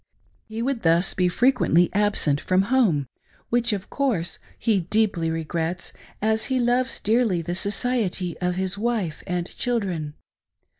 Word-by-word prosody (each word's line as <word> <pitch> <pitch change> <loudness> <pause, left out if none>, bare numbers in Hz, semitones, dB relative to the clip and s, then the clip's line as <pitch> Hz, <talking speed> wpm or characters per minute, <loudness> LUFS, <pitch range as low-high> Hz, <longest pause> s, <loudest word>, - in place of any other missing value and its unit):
He 220 +1 -4
would 260 -2 -1
thus 170 +2 +3
be 180 -1 +2
frequently 180 - +3
absent 200 -8 +2
from 185 +1 +2
home, 175 - +3 0.4
which, 240 0 +2
of 200 -2 -4
course; 220 - -1 0.2
he 220 -4 +2
deeply 180 -2 +1
regrets, 165 +2 -3 0.3
as 220 0 +2
he 260 -1 0
loves 245 +1 +1
so - - -9
dearly 215 -6 +2
the 175 - -3
society 200 -3 -1
of 180 0 -1
his 190 +1 -2
wife 215 -8 -1
and 180 -1 -1
children. 185 -11 -2
195 Hz, 145 wpm, -24 LUFS, 175-235 Hz, 0.4 s, thus